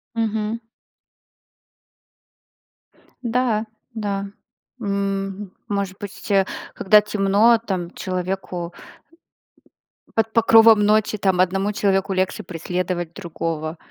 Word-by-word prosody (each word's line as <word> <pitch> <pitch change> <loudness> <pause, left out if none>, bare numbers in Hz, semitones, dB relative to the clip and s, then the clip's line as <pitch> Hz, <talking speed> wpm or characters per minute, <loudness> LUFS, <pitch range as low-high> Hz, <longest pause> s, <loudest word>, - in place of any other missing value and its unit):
Мгм. 220 0 -1 2.6
Да, 235 -2 +1 0.3
да. 200 -2 -2 0.5
М 200 -2 -1 0.4
может 200 -2 -2
быть, 205 0 -8
а, 195 -1 +4 0.3
когда 210 +2 +5
темно, 210 +3 +3
там 180 -3 -3
человеку 185 -2 -4 1.4
под 225 0 +1
покровом 225 -1 +7
ночи, 215 0 +2
там 190 -3 +1
одному 195 +3 +2
человеку 195 -1 +1
легче 185 0 -1
преследовать 175 0 -3
другого, 165 -3 -4
200 Hz, 85 wpm, -22 LUFS, 185-215 Hz, 2.6 s, покровом